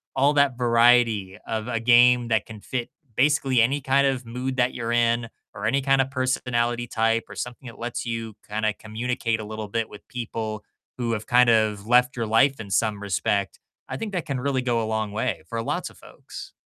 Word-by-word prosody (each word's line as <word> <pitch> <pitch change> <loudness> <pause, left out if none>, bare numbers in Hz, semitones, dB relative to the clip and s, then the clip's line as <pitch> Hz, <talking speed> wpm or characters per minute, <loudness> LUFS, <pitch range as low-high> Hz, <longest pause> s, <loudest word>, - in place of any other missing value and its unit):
all 140 +2 +4
that 140 -4 +3
variety 115 -5 +3
of 110 +1 -3
a 115 -2 -1
game 120 0 +5
that 110 -3 +1
can 110 -2 -11
fit 120 +1 -4 0.3
basically 135 -3 +3
any 135 +5 +1
kind 140 +1 +3
of 130 -2 -2
mood 125 +3 -4
that 125 0 +2
you're 115 0 -3
in 120 0 +2 0.3
or - - -6
any 135 +5 +2
kind 135 0 +3
of 135 - -2
personality 120 -2 -1
type 115 +1 +1
or - - -10
something 125 +1 -6
that 115 - -10
lets 120 +1 -4
you 115 -2 -4
kinda 110 0 -1
communicate 115 +1 -3
a - - -6
little 110 0 -6
bit 115 +2 -2
with 105 - -13
people 110 -3 -5 0.3
who 120 -2 -1
have 110 -1 -3
kind 125 0 +5
of 110 -3 +2
left 125 +2 +3
your 115 - -2
life 115 +4 +3
in 100 -3 -9
some 105 0 +1
respect, 100 0 -1 0.3
I - - -4
think 220 -3 -5
that 180 -3 -2
can 135 -3 -3
really 135 0 0
go 120 -2 0
a - - -2
long 110 -1 -2
way 110 -5 -2
for 115 - -2
lots - - -3
of - - -19
folks. - - -11
120 Hz, 210 wpm, -24 LUFS, 110-125 Hz, 0.3 s, game